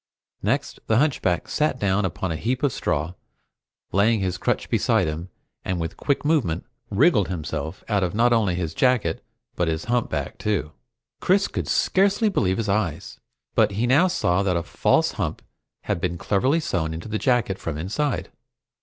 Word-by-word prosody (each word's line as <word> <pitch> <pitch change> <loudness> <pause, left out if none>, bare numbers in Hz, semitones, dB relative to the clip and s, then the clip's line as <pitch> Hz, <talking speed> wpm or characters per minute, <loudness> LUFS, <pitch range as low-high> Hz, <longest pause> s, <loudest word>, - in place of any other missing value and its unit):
Next, - - -1
the 110 - +3
hunchback 125 - +1
sat 150 -3 0
down 100 -2 +1
upon 95 0 -3
a - - -1
heap 120 - -2
of 140 -5 +2
straw, 80 +5 -1 0.8
laying 105 +4 +3
his 95 -2 -2
crutch - - 0
beside - - +2
him, 80 +4 -4 0.3
and 95 -1 -2
with 85 0 -2
a - - -21
quick 140 0 -1
movement, 145 - +1 0.2
wriggled 110 - +3
himself 80 -1 -4
out 105 -3 +1
of 90 +2 -2
not 120 +2 +4
only 105 -6 +2
his 85 -3 -3
jacket 120 -7 +1 0.3
but 90 - 0
his 80 0 -2
humpback 120 0 -1
too! 100 -8 -1 0.5
Chris 195 +2 +3
could - - -4
scarcely 200 +3 +2
believe 95 - +1
his 115 - -2
eyes, 100 -6 -2 0.3
but - - +3
he 110 +5 0
now 140 +9 +5
saw 95 - +1
that 95 -3 +1
a 85 - -2
false - - +2
hump - - -3 0.4
had 85 - -2
been 90 -2 -1
cleverly 130 - +1
sewn 80 - -2
into 85 - -7
the 110 0 -2
jacket 120 -7 +1
from 80 -3 -4
inside. 110 - -2
100 Hz, 175 wpm, -24 LUFS, 85-125 Hz, 0.8 s, now